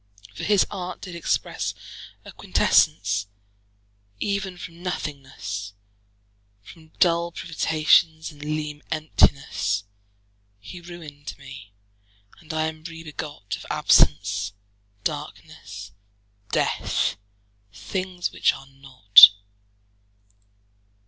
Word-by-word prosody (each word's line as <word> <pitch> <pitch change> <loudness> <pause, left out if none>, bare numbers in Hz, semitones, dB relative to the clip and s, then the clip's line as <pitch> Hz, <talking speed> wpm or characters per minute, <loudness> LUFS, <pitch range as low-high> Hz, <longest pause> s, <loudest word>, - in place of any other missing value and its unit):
For - - -8
his 205 -2 +4
art 185 -3 -5
did 180 - -8
expresse 170 - -2 0.5
A - - -10
quintessence 100 +1 +2 0.9
even 195 -2 -2
from 170 -1 -10
nothingnesse, 135 - -5 0.9
From 160 +8 -15
dull 170 -1 +3
privations, 160 0 +2
and 145 -1 -16
leane 150 0 -4
emptinesse: 140 -9 +1 0.8
He 175 - -10
ruin'd 160 -5 -10
mee, 135 -7 -12 0.6
and 160 -1 -10
I 155 0 0
am 160 0 -6
re 165 0 -9
begot 150 -9 -6
Of - - -12
absence, 100 +7 +3 0.5
darknesse, 150 - -6 0.6
death; - - 0 0.5
things 185 - -4
which - - +2
are 135 - -11
not. 135 -8 +8
155 Hz, 90 wpm, -24 LUFS, 130-170 Hz, 0.9 s, not